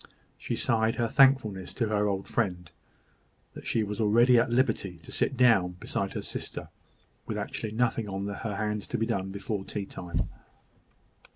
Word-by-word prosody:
She - - -3
sighed 110 -1 +1
her 120 -1 +1
thankfulness 115 -8 +3
to 115 -3 0
her 105 -1 +2
old 95 -1 -2
friend, 90 -7 -1 0.8
that - - -9
she 115 - +1
was 105 +1 -3
already 120 +3 +5
at 120 +2 +2
liberty 120 -7 +1
to - - -11
sit 135 - 0
down 115 -8 +5
beside 90 - -3
her - - -4
sister, - - -6 0.6
with - - -3
actually 110 -1 -4
nothing 115 -2 0
on 95 0 -3
her 100 +1 -4
hands 105 0 -2
to - - -2
be 115 - +1
done 95 -3 -1
before 100 +1 -3
tea 100 0 -4
time. 90 -1 -3
105 Hz, 170 wpm, -28 LUFS, 95-115 Hz, 0.8 s, already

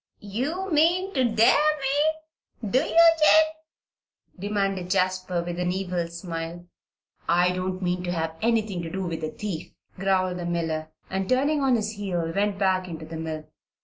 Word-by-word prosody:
"You 330 - -2
mean 350 +5 +3
to 260 - +2
dare 230 +4 +4 0.2
me; 295 -5 -2
do 260 - +4
ye, 300 - -2
Jabe?" 320 -1 +6 0.9
demanded 195 -2 -1
Jasper, 185 -2 0
with 175 0 -5
an 180 0 0
evil 180 -2 -2
smile. 170 0 -6 0.6
"I 175 +1 +4
don't 185 +1 -3
mean 180 0 0
to 175 - -1
have 160 -2 -2
anything 220 -5 +1
to 165 - -5
do 190 +3 -3
with 165 -2 -4
a 155 - -1
thief," 195 -5 -6 0.3
growled 185 -1 +1
the 175 - -4
miller, 160 -2 -2 0.2
and 190 0 -2
turning 285 +4 +2
on 265 -2 +3
his 215 -2 -1
heel 185 -6 -3
went 200 0 +1
back 190 -2 +1
into 160 -2 -7
the 160 +1 -7
mill. 160 -1 -5
190 Hz, 165 wpm, -25 LUFS, 175-240 Hz, 0.9 s, Jabe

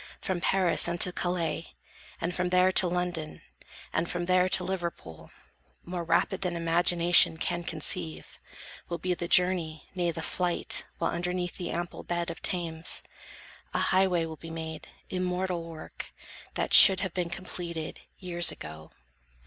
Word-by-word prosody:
From 185 -2 -3
Paris 185 -3 +3
unto 175 +1 +1
Calais, 170 -3 -2 0.5
and 170 +2 -2
from 180 0 0
there 180 +1 +4
To 185 - +4
London, 175 -3 -3 0.5
and 170 - 0
from 175 0 -2
there 185 0 +3
to - - +5
Liverpool, 170 - -5 0.6
More 175 0 -4
rapid 170 +3 +1
than 180 -2 -1
imagination 170 0 +4
can 175 +1 -2
Conceive, 85 - -4 0.5
will 170 - -2
be 180 +1 -1
the 175 -1 -4
journey, 175 -4 +2
nay 175 -2 0
the 165 -1 -4
flight; 180 -1 0
While - - -1
underneath 180 0 -2
the 180 - -5
ample 175 +1 -4
bed 170 0 -2
of 165 - -10
Thames, 165 -3 -2 0.7
A - - +2
highway 185 -3 +3
will 160 -1 -8
be 165 - -10
made, 160 -1 -7 0.2
immortal 180 -1 -2
work, 165 -1 -9 0.4
That - - -2
should 190 -2 +11
have 190 -4 -3
been 180 -2 -2
completed, 175 -3 -6 0.2
years 175 -2 +2
ago. 80 +1 -10
175 Hz, 150 wpm, -28 LUFS, 165-180 Hz, 0.7 s, should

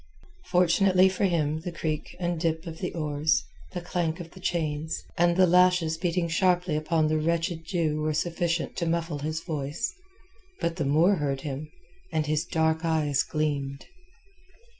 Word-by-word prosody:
Fortunately 185 - +4
for 190 +1 0
him 155 -4 +1
the 175 +2 -5
creak 155 -2 -3
and 175 -2 -1
dip 160 -1 -1
of 160 -1 -7
the 180 - -3
oars, 155 +6 +1 0.3
the 175 - -3
clank 170 -1 -2
of 170 -1 -8
chains, 160 -3 -2
and 175 0 +3
the 185 - +7
lashes 180 -2 +4
beating 170 0 0
sharply 180 -1 +2
upon 155 +1 +1
the 155 0 +1
wretched 165 +1 -1
Jew 160 -4 0
were 155 0 0
sufficient 170 0 -1
to 170 - -1
muffle 165 -2 -1
his 155 +3 -3
voice. 150 -2 -3 0.7
But 170 +1 -1
the 155 - -1
Moor 165 +8 +4
heard 140 -3 -1
him, 145 +1 -5 0.4
and 155 - 0
his 150 0 0
dark 160 -1 +1
eyes 155 -4 +2
gleamed. 140 -3 -2
165 Hz, 160 wpm, -27 LUFS, 155-175 Hz, 0.7 s, the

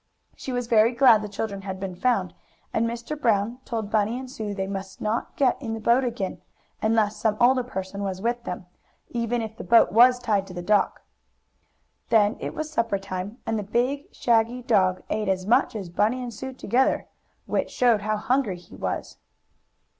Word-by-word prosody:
"She 265 - -6
was 245 -1 -1
very 230 +1 +4
glad 235 -4 +6
the 210 - -5
children 200 -1 -4
had 190 -1 -6
been 190 -1 -4
found, 245 +7 0 0.4
and 230 - +1
Mr. 235 +5 -5
Brown 230 -3 +1
told 220 -3 -4
Bunny 220 +2 +1
and 260 0 -7
Sue 210 -5 -4
they 190 -1 -2
must 195 0 -6
not 215 +2 -2
get 265 -1 +2
in 225 -4 -3
the - - -6
boat 235 +4 +3
again, 230 -6 -3 0.4
unless 220 -1 +2
some 210 0 0
older 255 +1 +5
person 200 -5 -5
was 190 -2 -3
with 235 +3 -1
them, 180 -4 -5 0.5
even 235 0 -1
if 220 0 -6
the - - -8
boat 230 -5 +5
was 245 +4 +6
tied 210 -5 0
to 180 - -10
the 175 - -5
dock. 205 +1 +1 1.1
Then 215 -1 +4
it - - -5
was 310 0 -4
supper 230 -7 0
time, 195 +2 -6
and 225 -1 -1
the - - -3
big, 250 +7 -1
shaggy 235 +1 +1
dog 185 -6 +2
ate 210 -1 -1
as 185 -1 0
much 225 +1 +3
as 200 -4 -4
Bunny 225 +8 +1
and 240 -1 -6
Sue 260 +5 -6
together, 255 +1 +1 0.4
which - - -1
showed 235 -4 +3
how 215 +1 -1
hungry 250 -4 0
he 175 - -15
was. - - -4
225 Hz, 190 wpm, -25 LUFS, 200-245 Hz, 1.1 s, glad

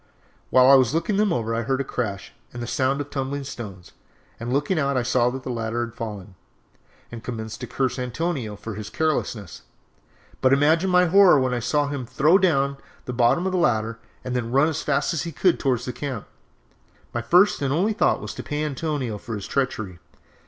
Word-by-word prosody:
"While 130 0 +6
I 135 - +8
was 130 0 +5
looking 195 +5 0
them 210 -2 +2
over 115 -4 -1
I 115 - 0
heard 130 +3 -1
a - - 0
crash 105 -7 -4 0.2
and 120 0 -6
the - - -3
sound 130 +3 0
of 145 - -8
tumbling 140 +1 -3
stones, 105 -9 -8 0.5
and 120 +1 -4
looking 145 +6 +1
out 140 -2 +1
I 125 - +1
saw 125 0 +2
that 130 +1 -6
the 130 - -4
ladder 115 0 -2
had 115 - -11
fallen, 105 -5 -7 0.8
and 115 -1 -8
commenced 110 -3 -6
to - - -5
curse 130 -1 -1
Antonio 125 -3 -3
for 110 +2 -7
his 105 0 -7
carelessness; 145 - -2 0.8
but 130 +1 +4
imagine 160 +6 +3
my 180 0 +5
horror 180 -3 +6
when 130 -1 0
I 120 - 0
saw 145 +5 +1
him 140 -4 -4
throw 150 +9 +4
down 140 -7 +2 0.3
the 125 - -4
bottom 120 +9 +2
ladder 115 -12 +1 0.2
and 125 0 -3
then 120 -2 -2
run 140 +5 +4
as 155 - -3
fast 140 +2 0
as 165 - -1
he 170 - -4
could 180 +3 +2
towards 125 -3 0
the 125 - -4
camp. 125 -3 -5 0.9
My 120 - -1
first 180 - +4
and 135 -2 0
only 190 +9 +1
thought 215 - +2
was - - -6
to - - -6
pay 150 +1 -3
Antonio 140 -6 -3
for 115 0 -6
his 100 - -6
treachery. 110 -10 -2
130 Hz, 205 wpm, -24 LUFS, 115-150 Hz, 0.9 s, I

